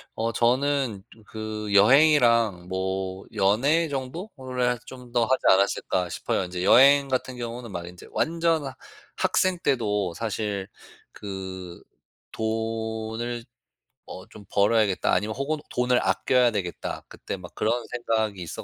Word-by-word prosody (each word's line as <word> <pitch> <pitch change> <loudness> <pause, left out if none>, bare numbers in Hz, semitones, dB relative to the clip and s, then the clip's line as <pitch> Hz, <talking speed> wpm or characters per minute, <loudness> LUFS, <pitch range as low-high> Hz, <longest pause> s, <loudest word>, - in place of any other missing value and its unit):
어 115 +1 -1
저는 125 -3 +1
좀 110 - -18
그 110 -1 -5
여행이랑 115 - +5
뭐 95 0 -3
연애 135 +12 +3
정도를 130 - -3
좀 125 -2 -11
더 120 -1 +2
하지 130 +2 +1
않았을까 95 -2 +2
싶어요. 90 - -1
인제 90 0 -4
여행 140 +6 +6
같은 130 -1 -2
경우는 120 -1 -6
막 85 -2 -5
인제 90 0 -12
완전 165 -1 +1 0.5
학생 185 -1 +1
때도 105 - 0
사실 105 -3 -3 0.4
그 95 -3 -8 0.5
'돈을 110 +1 -3 0.6
어 95 - -9
좀 105 - -13
벌어야겠다.' 100 -1 +2
아니면 105 +1 0
혹은 140 +4 -1
'돈을 125 0 +2
아껴야 125 -2 +2
되겠다.' 95 -5 -4
그때 - - -6
막 90 -2 -11
그런 120 +2 0
생각이 110 -5 -1
있어 85 - -6
115 Hz, 255 characters per minute, -25 LUFS, 100-125 Hz, 0.6 s, 여행